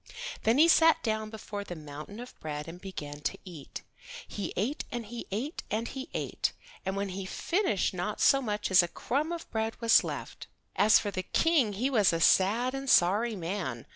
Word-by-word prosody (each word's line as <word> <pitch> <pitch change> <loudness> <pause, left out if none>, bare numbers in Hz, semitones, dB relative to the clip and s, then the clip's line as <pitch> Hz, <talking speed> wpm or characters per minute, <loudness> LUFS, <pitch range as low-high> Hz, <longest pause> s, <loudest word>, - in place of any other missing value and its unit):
Then 225 +3 +4
he 315 +3 +7
sat 325 -1 +5
down 220 -1 -1
before 210 -2 -6
the 180 - -7
mountain 150 +6 -9
of 245 +1 -9
bread 150 -1 -5
and 175 +2 -9
began 145 -7 -7
to - - -2
eat. 165 -7 -9 0.4
He 205 - -4
ate 245 +11 -1
and 240 -1 -4
he 235 +3 -7
ate, 250 - -3
and 225 +2 -1
he 265 -1 -7
ate, - - -1 0.3
and 190 0 -2
when 200 0 -2
he 190 0 -5
finished 340 - 0
not 185 +4 -3
so 275 - +5
much 210 -5 -2
as 190 0 +8
a 175 - -1
crumb 290 - -2
of 340 -1 -5
bread 220 0 -2
was 230 -1 +5
left. - - -6 0.3
As 215 +2 +6
for 205 - -2
the 185 - -2
King 280 - +2
he 250 +8 -1
was 210 -8 +4
a 165 - 0
sad 220 +9 +4
and 270 0 -4
sorry 210 +6 +4
man. 170 - -4
210 Hz, 200 wpm, -29 LUFS, 185-245 Hz, 0.4 s, as